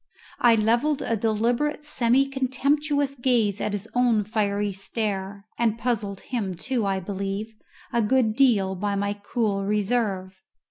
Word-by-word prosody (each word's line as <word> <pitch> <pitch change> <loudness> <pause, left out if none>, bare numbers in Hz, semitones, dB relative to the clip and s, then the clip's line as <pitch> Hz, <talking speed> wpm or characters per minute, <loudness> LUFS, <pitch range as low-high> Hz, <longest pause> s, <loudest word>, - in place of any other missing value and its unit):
I 235 -2 +6
levelled 235 +7 +1
a 230 - 0
deliberate 235 +8 0
semi 260 -2 +2
contemptuous 280 +2 0
gaze 240 -6 +1
at 210 - -1
his 205 +1 -4
own 245 -4 +3
fiery 205 -1 -1
stare, 200 0 -3
and 230 -2 +2
puzzled 215 -5 -2
him, 205 -7 -3
too, 235 +3 -1
I 195 -1 0
believe, 195 +3 -4 0.4
a 235 - +3
good 220 -1 +2
deal 220 -8 +3
by 200 +2 -2
my 200 0 0
cool 205 -1 -1
reserve. 200 -2 -1
220 Hz, 140 wpm, -25 LUFS, 200-245 Hz, 0.4 s, I